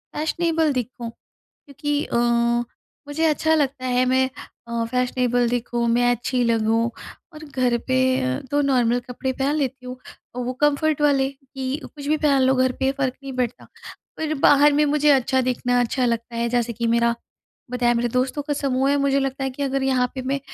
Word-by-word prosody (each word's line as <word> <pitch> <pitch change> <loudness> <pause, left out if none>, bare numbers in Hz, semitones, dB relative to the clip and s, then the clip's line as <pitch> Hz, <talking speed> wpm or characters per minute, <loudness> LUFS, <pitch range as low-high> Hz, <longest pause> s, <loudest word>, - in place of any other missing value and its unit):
Fashionable 320 -1 0
दिखूँ। 245 -1 -4 0.4
क्योंकि 290 +1 -4
अ, - - -3 0.9
मुझे 315 +3 -1
अच्छा 315 +1 +2
लगता 275 -3 -1
है 250 0 +2
मैं 260 +1 +2 0.4
अ, 235 0 -1
फैशनेबल 250 -1 +1
दिखूँ, 240 0 -1
मैं 245 +1 +3
अच्छी 245 +1 0
लगूँ 230 0 +1 0.4
और 310 0 -10
घर 255 -4 0
पे 260 0 +2 0.2
अ, 130 0 -1
तो 290 - +2
नॉर्मल 245 -3 +2
कपड़े 260 +1 -3
पहन 275 +3 -1
लेती 260 -3 -3
हूँ 250 - -6 0.4
और 250 0 -3
वो 250 - -2
कम्फर्ट 295 +1 +2
वाले 275 -2 +3
की 270 -1 -6
कुछ 285 -2 -10
भी 310 - +2
पहन 290 -3 +2
लो 260 +1 +4
घर 255 0 +2
पे 265 - +2
फ़र्क 265 -2 -2
नहीं 275 -1 -6
पड़ता। 250 -1 -3 0.5
पर 315 -1 -2
बाहर 290 +1 +6
में 295 +1 +3
मुझे 295 0 +3
अच्छा 260 -1 +3
दिखना 245 0 0
अच्छा 250 +2 0
लगता 235 0 -2
है 235 0 0
जैसे 240 0 0
कि 235 +1 -3
मेरा 235 0 +2 0.6
बताया 245 -1 +1
मेरे 240 +1 0
दोस्तों 255 +4 -1
का 290 - -3
समूह 270 -1 0
है 285 - +3
मुझे 275 0 +2
लगता 270 0 -2
है 265 - -1
कि 270 +2 -6
अगर 275 0 -1
यहाँ 260 -2 +2
पे 260 - -4
मैं 270 +2 -1
260 Hz, 190 wpm, -22 LUFS, 245-280 Hz, 0.9 s, बाहर